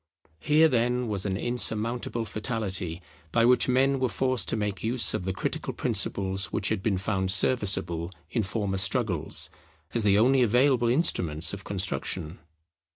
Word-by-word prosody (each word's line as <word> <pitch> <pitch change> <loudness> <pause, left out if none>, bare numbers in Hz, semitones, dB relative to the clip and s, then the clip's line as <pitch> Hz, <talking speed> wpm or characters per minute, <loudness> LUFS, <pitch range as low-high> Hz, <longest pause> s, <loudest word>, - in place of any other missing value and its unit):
Here 155 - +4
then 125 -2 0
was 100 -1 -1
an 95 -1 -2
insurmountable 115 0 -2
fatality 95 -7 -4 0.3
by 115 +5 +3
which 125 +1 +4
men 135 +2 +2
were 130 -1 0
forced 130 +2 -1
to - - 0
make 105 -2 -3
use 115 +2 +2
of 90 - -3
the 95 - -1
critical 95 - -4
principles 95 -1 +1
which 100 +3 -1
had 110 -3 -1
been 100 -2 0
found 95 -1 -2
serviceable 95 -5 +2 0.2
in 115 - 0
former 100 -1 -2
struggles, 100 - 0 0.4
as 115 - 0
the 100 -1 +3
only 130 +4 +4
available 125 +1 +3
instruments 90 - +1
of 100 -1 -8
construction. 90 -3 -3
110 Hz, 155 wpm, -26 LUFS, 95-125 Hz, 0.4 s, Here